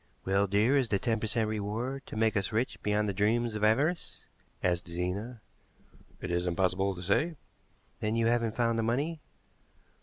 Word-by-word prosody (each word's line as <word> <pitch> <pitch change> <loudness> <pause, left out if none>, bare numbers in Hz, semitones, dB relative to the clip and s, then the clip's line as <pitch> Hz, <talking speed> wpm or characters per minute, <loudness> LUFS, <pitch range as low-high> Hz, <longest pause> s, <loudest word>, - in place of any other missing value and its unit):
"Well, 100 +1 +2
dear, 105 +7 +3
is 125 -4 0
the 100 - +2
ten 115 +2 0
per 110 - -2
cent. 110 0 +1
reward 110 +6 -3
to - - -8
make 110 0 +2
us 100 +1 0
rich 115 +4 -1
beyond 105 0 +1
the 100 - -1
dreams 110 +4 +1
of 105 0 -3
avarice?" 145 +11 +1 0.4
asked 90 -1 +1
Zena. 95 +7 -3 0.8
"It 95 - -4
is 90 +1 0
impossible 95 +2 +1
to 90 - -7
say." 160 - +1 0.6
"Then 110 +1 -1
you 115 0 +2
haven't 115 -1 +1
found 115 -1 +1
the - - +1
money?" 145 +8 0
110 Hz, 180 wpm, -30 LUFS, 100-120 Hz, 0.8 s, dear